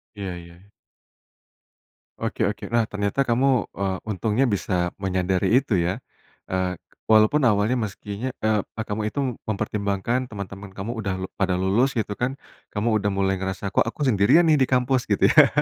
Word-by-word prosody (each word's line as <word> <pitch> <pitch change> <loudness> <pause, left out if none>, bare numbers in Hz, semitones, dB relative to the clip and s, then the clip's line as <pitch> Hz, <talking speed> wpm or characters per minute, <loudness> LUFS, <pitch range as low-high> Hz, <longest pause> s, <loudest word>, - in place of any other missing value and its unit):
Iya, 95 -3 -5
ya. 85 +3 -14 1.5
Oke - - -3
oke. - - -12
Nah, 115 - +4
ternyata 105 +5 -1
kamu, 130 +1 +1
eee, 95 -1 0
untungnya 110 +4 0
bisa 90 -6 0
menyadari 95 +2 +1
itu, 105 -9 +1
ya. 90 +8 -1 0.5
Eee, 95 0 0 0.3
walaupun 110 +6 +5
awalnya 105 +4 +2
meskinya, 105 +2 -4
eee, 110 -2 +2 0.3
kamu 105 +1 -2
itu 125 - -4 0.3
mempertimbangkan 105 +3 -1
teman-teman 100 -2 -8
kamu. 100 +4 -4
Udah 95 -3 -2
le-pada 95 -1 -1
lulus, 100 +9 +1
gitu, 110 -3 -1
kan. 130 +2 -1 0.4
Kamu 110 +3 +1
udah 100 - -1
mulai 95 -1 +1
ngerasa, 95 +1 -3
“Kok 115 - +2
aku 115 - -6
sendirian, 125 - +5
nih, 150 - +4
di 130 - +3
kampus,” 130 0 +1
gitu, - - +3
ya. - - +8
105 Hz, 155 wpm, -24 LUFS, 95-120 Hz, 1.5 s, ya